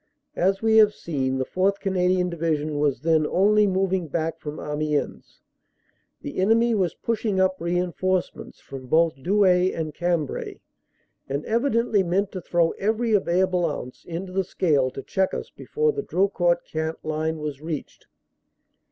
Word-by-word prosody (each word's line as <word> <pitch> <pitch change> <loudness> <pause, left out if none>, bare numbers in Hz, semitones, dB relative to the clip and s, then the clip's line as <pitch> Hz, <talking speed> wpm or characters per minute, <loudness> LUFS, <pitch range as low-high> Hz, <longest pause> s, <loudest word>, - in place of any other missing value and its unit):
As 195 +3 +1
we 220 0 +4
have 210 -1 +6
seen, 135 -5 -2
the 130 - -1
4th. 195 +5 0
Canadian 180 -1 +1
Division 155 -3 -1
was 145 -2 +1
then 160 -1 +2
only 210 +2 +3
moving 190 -2 0
back 160 +2 -2
from 150 0 -7
Amiens. 150 0 -3 0.8
The 145 - -5
enemy 230 +4 +3
was 185 -6 0
pushing 215 -4 -1
up 185 -1 +1
reinforcements 180 +1 -2
from 135 -2 -10
both 160 -1 +2
Douai 185 0 +3
and 155 -2 -4
Cambrai 170 -4 -2 0.7
and 140 +2 -3
evidently 230 -3 +1
meant 190 +3 0
to 185 - -6
throw 170 -1 +1
every 220 +3 0
available 185 -2 +2
ounce 125 -3 -7
into 175 +3 -6
the 195 0 +1
scale 150 -8 +1
to 135 +1 -8
check 190 -1 0
us - - -6
before 455 0 -1
the 425 - -3
Drocourt 175 - +1
Queant 160 0 -2
line 155 +1 -1
was 150 -2 -5
reached. 155 -2 -6
180 Hz, 150 wpm, -24 LUFS, 155-195 Hz, 0.8 s, have